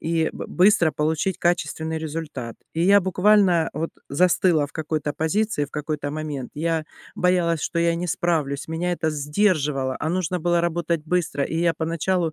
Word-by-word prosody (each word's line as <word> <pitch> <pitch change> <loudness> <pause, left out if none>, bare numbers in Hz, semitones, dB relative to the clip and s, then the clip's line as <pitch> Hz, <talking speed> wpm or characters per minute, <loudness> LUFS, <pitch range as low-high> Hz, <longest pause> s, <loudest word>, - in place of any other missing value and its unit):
и 160 0 0
б - - -6
быстро 180 -4 +4
получить 160 +4 -1
качественный 160 -2 -1
результат, 150 -7 -5 0.2
и 165 - -1
я 200 +2 +6
буквально 190 -2 +3
вот 160 +3 -3 0.2
застыла 170 0 +3
в - - -20
какой-то 155 -1 -2
позиции 160 +1 0
в 145 - -12
какой-то 150 -1 -3
момент, 150 -4 -5
я 160 +1 -1 0.3
боялась, 175 -3 +2
что 170 - -1
я 170 0 +2
не 180 +1 -3
справлюсь, 155 -6 -1
меня 170 +2 -1
это 160 -2 -1
сдерживало, 150 -3 0
а 155 - -2
нужно 180 +1 -1
было 175 +1 +2
работать 170 -2 -1
быстро, 165 -4 0
и 160 - -4
я 170 0 +2
поначалу 165 +1 -1
165 Hz, 165 wpm, -23 LUFS, 150-175 Hz, 0.3 s, я